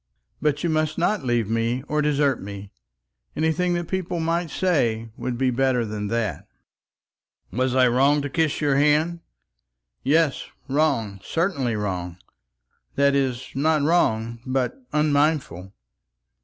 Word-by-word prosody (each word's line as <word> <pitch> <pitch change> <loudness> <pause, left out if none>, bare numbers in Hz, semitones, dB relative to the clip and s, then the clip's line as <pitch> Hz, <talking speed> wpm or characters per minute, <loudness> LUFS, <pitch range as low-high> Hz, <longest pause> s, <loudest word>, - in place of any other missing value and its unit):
But 150 0 0
you 170 - +1
must 155 -1 0
not 190 +1 +1
leave 120 -4 0
me 115 +3 -1
or 150 0 0
desert 145 -3 +1
me. 100 0 -8 0.6
Anything 160 +3 +1
that 175 -1 -3
people 185 -2 -2
might 165 +1 -1
say 120 -12 0
would 125 -2 -4
be 130 0 +1
better 125 -1 +1
than 105 -1 -4
that." 110 -7 -2 1.0
"Was 130 +1 0
I 130 -1 +5
wrong 140 +4 +3
to - - -2
kiss 160 -1 0
your 145 -2 +2
hand?" 150 +4 +2 0.8
"Yes, 150 +1 +2 0.2
wrong, 135 -9 0
certainly 145 - -1
wrong; 90 -4 -3 0.8
that 140 0 +3
is, 130 -2 -1
not 150 +2 +2
wrong, 115 -8 +1
but 130 -1 -1 0.2
unmindful." 145 - +1
135 Hz, 130 wpm, -24 LUFS, 115-155 Hz, 1.0 s, I